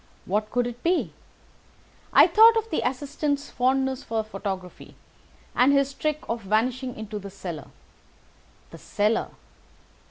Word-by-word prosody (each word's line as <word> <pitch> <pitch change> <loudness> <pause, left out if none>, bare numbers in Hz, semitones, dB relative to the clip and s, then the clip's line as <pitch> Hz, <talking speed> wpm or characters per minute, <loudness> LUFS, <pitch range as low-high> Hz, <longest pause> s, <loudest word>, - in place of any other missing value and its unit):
What 210 +3 -1
could 245 -1 0
it 245 0 -6
be? 350 +2 0 1.0
I - - +8
thought 450 +1 +7
of 450 0 -2
the - - 0
assistant's 285 +2 -2
fondness 265 +1 0
for 225 -4 -2
photography, 195 -4 -7 0.6
and 255 +3 +5
his 275 0 +2
trick 305 +1 -2
of 230 0 -3
vanishing 240 +5 -1
into 215 -1 -6
the 200 0 -8
cellar. 175 -7 -7 1.0
The - - -11
cellar! 210 +2 0
245 Hz, 130 wpm, -25 LUFS, 210-280 Hz, 1.0 s, I